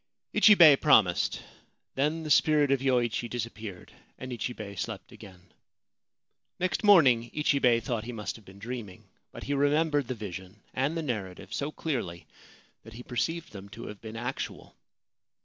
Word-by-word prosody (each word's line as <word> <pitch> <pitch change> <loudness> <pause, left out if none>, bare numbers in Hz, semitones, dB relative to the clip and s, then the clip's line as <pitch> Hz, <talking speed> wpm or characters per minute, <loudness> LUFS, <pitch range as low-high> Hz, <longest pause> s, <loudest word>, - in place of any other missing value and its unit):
Ichibei 170 -9 +8
promised. 110 - +3 0.5
Then 150 +4 -1
the 155 - -4
spirit 150 -1 +4
of 135 - +3
Yoichi 120 -3 0
dis 120 -1 -2
appeared, 105 -5 -10 0.2
and 130 0 -7
Ichibei 110 -3 -5
slept 100 -1 -6
again. 95 -4 -15 1.1
Next 185 +4 -1
morning 130 - +5
Ichibei 140 -5 +3
thought 115 -1 -3
he 125 - -5
must 105 -3 -5
have 110 - -14
been 95 0 -15
dreaming; 110 -3 -7 0.3
but - - -10
he 145 - -2
remembered 145 0 +2
the 130 - -3
vision 95 -1 -9
and 140 +6 -1
the 165 - -2
narrative 105 -9 -5
so 145 +2 -2
clearly 115 - -4 0.6
that 115 - -13
he 120 +2 -9
perceived 165 +8 -3
them 100 -1 -10
to 115 +2 -9
have 105 - -10
been 110 0 -8
actual. 125 +3 -6
120 Hz, 155 wpm, -28 LUFS, 105-145 Hz, 1.1 s, Ichibei